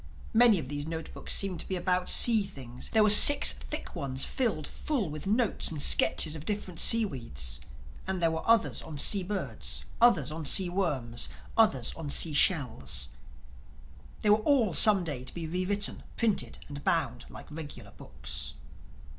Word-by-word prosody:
Many 230 -2 +5
of 155 - -6
these 145 +2 -6
note 160 -1 -7
books - - -7
seemed 190 -4 -1
to - - -6
be 190 - -4
about 180 0 -2
sea 230 -3 +6
things. 125 -9 -9
There 220 -1 +3
were 210 - +3
six 285 +7 +8
thick - - -8
ones 135 -1 -3
filled 225 - -3
full 240 - -4
with 150 +4 -8
notes 225 +2 -1
and 155 - -7
sketches 140 +2 +3
of 155 -2 -9
different 190 -3 -5
seaweeds; 115 - +1 0.5
and 190 -1 -3
there 165 -1 0
were 160 - -4
others 230 -1 +1
on 155 -2 -10
sea 195 +7 +3
birds; 140 - -5 0.2
others 185 - +3
on 160 +1 -7
sea 185 +3 +4
worms; 135 -11 -2 0.3
others 185 - +1
on 160 -3 -8
seashells. 145 - +2 1.1
They 210 - +1
were 210 - +5
all 225 - 0
some 205 -1 +5
day 145 -7 -6
to 130 - -10
be 170 -2 -6
re 180 +3 -4
written, 205 0 -3 0.2
printed 225 -4 -2
and 145 -1 -10
bound 125 -8 -2
like - - -12
regular 150 -1 -10
books. - - -4
170 Hz, 170 wpm, -27 LUFS, 145-205 Hz, 1.1 s, six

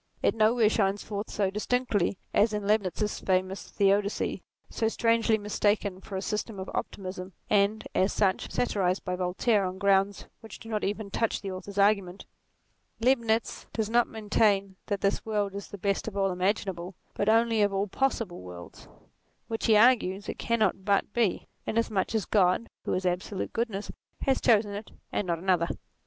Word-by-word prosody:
It - - +4
nowhere 220 +1 +4
shines 200 -2 +1
forth 205 0 -5
so 195 -2 0
distinctly 210 -3 0 0.2
as 215 +1 +3
in 210 -1 -2
Leibnitz's 210 0 0
famous 185 +1 -1
Theodicee, 200 0 +1 0.3
so 225 - -1
strangely 230 0 +2
mistaken 205 -2 0
for 195 - -8
a 190 - -4
system 210 -1 -3
of 190 - -6
optimism, 185 -1 -5 0.2
and, 205 +1 +2
as 190 +2 +2
such, 190 -3 +1
satirized 190 -6 0
by 180 -1 -1
Voltaire 185 +4 +1
on 185 0 -3
grounds 195 0 +2
which 225 - -10
do 225 - -12
not 215 -2 -2
even 205 0 -3
touch 225 +2 0
the 195 - -4
author's 195 +2 -8
argument. 200 -2 +2 0.7
Leibnitz 230 -2 +1
does 220 -1 -2
not 240 0 +4
maintain 205 -3 +1
that 200 -2 -2
this 200 - +1
world 205 -3 -1
is 200 0 -6
the 205 - -9
best 200 +2 -1
of 205 -2 -5
all 195 -1 +2
imaginable, 185 -1 -2 0.2
but 205 - 0
only 225 0 +3
of 205 -1 +3
all 195 +1 0
possible 230 - -1
worlds; 90 -1 -11 0.6
which, 225 -1 -2
he 220 - +6
argues, 210 -4 +4
it - - -5
cannot 215 -5 +1
but 200 0 +1
be, 230 -6 0 0.2
inasmuch 220 -2 0
as 215 -5 0
God, 195 +2 +2
who - - -1
is 185 0 -2
absolute 180 +2 -2
goodness, 220 -3 -2 0.3
has 270 -2 +2
chosen 210 -3 +3
it 205 +2 -6 0.2
and 205 - -1
not 170 -1 0
another. 175 -1 +1
205 Hz, 170 wpm, -28 LUFS, 190-220 Hz, 0.7 s, he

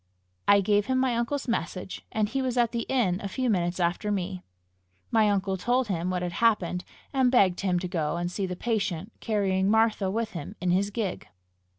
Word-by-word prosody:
I 200 0 +6
gave 205 +2 +2
him 260 0 +1
my 255 -2 +2
uncle's 240 +5 -1
message, 185 -4 -3
and 215 -1 +1
he 270 +5 -2
was 255 -1 -1
at 235 -2 +3
the 235 -1 -3
inn 205 -9 +1
a 200 - -3
few 250 +5 -1
minutes 175 -2 0
after 175 +4 0
me. 185 -2 -2 0.7
My 220 -2 +4
uncle 195 -1 0
told 245 +4 +1
him 175 -1 -1
what 180 -1 -1
had 175 - -2
happened, 190 -6 +2 0.3
and 260 -2 +3
begged 190 -8 +4
him 185 -3 +1
to 180 +1 -2
go 170 -2 -1
and 175 +1 -2
see 195 +1 -2
the 180 - -4
patient, 200 -3 -2
carrying 195 -3 +1
Martha 220 -3 +3
with 220 +2 -2
him 190 +3 -7
in 180 -1 0
his 195 +3 +2
gig. 205 -3 -3
200 Hz, 205 wpm, -27 LUFS, 180-230 Hz, 0.7 s, I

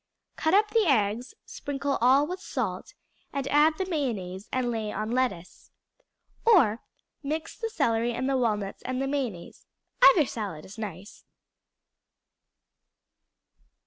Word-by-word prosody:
Cut 320 +4 +2
up 425 +1 +3
the 445 -5 +3
eggs, 235 - +1
sprinkle 280 -1 -3
all 265 +4 +5
with 365 +4 -5
salt, - - -4 0.4
and 275 -1 -3
add 305 +2 +4
the 380 - -1
mayonnaise 215 - -3
and 255 -2 0
lay 220 -2 -3
on 215 +1 -3
lettuce. 240 -9 -2 0.7
Or 270 - +5 0.4
mix 310 +3 -4
the 455 - -4
celery 235 - +1
and 245 +2 -2
the 275 - +1
walnuts 210 -6 -1
and 255 0 -3
mayonnaise; 265 -9 -4 0.3
either 340 -10 +7
salad 200 -11 -5
is 205 +4 -11
nice. 200 -1 -8
255 Hz, 125 wpm, -27 LUFS, 215-295 Hz, 0.7 s, either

